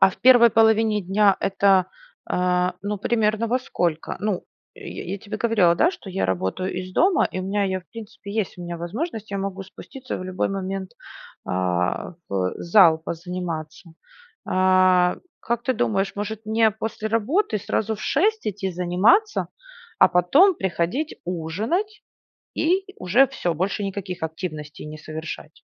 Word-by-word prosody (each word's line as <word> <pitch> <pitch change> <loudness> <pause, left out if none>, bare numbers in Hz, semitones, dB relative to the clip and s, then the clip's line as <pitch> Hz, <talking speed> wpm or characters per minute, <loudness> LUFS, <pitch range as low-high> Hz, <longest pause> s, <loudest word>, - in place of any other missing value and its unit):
А - - +8
в - - -13
первой 245 -2 +7
половине 220 -1 +3
дня 195 +1 +3
это, 195 -1 +3 0.4
а, 180 0 +1
ну 205 0 -3
примерно, 220 +1 +1
во 245 +3 +1
сколько? 170 -10 -2
Ну, 205 -3 -2 0.3
я - - -8
я 195 +3 -4
тебе 215 +2 -6
говорила, 215 -7 +3
да, 330 - +3
что 205 - -10
я 190 - -1
работаю 95 - -2
из 185 0 -5
дома 370 - +3
и 185 - -4
у - - -4
меня, 200 +2 0
я, 190 -1 -1
в 180 - -29
принципе, 215 -2 -9
есть 210 -4 -2
у 175 - -7
меня 175 0 -5
возможность, 215 - -5
я 200 - -2
могу 195 0 -4
спуститься 255 +7 -8
в 185 - -6
любой 185 0 -1
момент, 195 -1 -4 0.6
а, 90 - -1
в 95 -2 -1
зал 170 -2 +5
позаниматься. 170 0 -6 0.6
А 185 -1 +4 0.2
как 235 0 -2
ты 260 - +1
думаешь, 195 - 0
может 215 +1 -5
мне 220 0 +3
после 220 0 -4
работы 230 - +1
сразу 220 +2 -1
в 210 - -11
6 430 +9 +1
идти 195 -2 -2
заниматься? 185 - +2 0.5
А - - +8
потом 270 - +5
приходить 190 - -2
ужинать 210 - -2 0.5
и 365 +4 +2
уже 240 +10 +4
всё, 175 -8 -2
больше 195 +5 -1
никаких 195 -2 -5
активностей 155 -2 -6
не 155 - -8
совершать? 155 +1 -8
195 Hz, 155 wpm, -23 LUFS, 180-220 Hz, 0.6 s, А